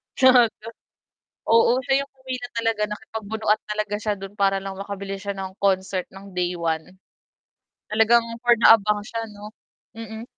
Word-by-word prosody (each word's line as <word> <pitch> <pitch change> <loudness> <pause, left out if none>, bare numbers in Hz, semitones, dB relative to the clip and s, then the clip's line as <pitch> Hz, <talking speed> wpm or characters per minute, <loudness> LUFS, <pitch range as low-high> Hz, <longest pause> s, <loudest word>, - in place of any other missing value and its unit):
chat 255 -4 +6 1.0
Oo, 230 +1 +5
siya 275 0 +2
yung - - -33
pumila 260 -2 -6
talaga, 225 -2 0
nakipagbunuan 215 0 -2
talaga 210 -1 -2
siya 215 -1 -1
do'n 195 +1 -9
para 195 -1 +2
lang 195 -1 -6
makabilis 195 0 -6
siya 200 - -2
ng 190 0 -6
concert 190 -1 0
ng 195 +1 -12
day 180 0 0
1. 165 +1 -3 1.0
Talagang 225 +2 +4 0.2
for 240 -1 +5
the 230 - -5
abang 210 -1 +5
siya 230 0 -4
'no, 210 0 -10 0.5
mm. 220 0 -7
210 Hz, 150 wpm, -23 LUFS, 195-230 Hz, 1.0 s, chat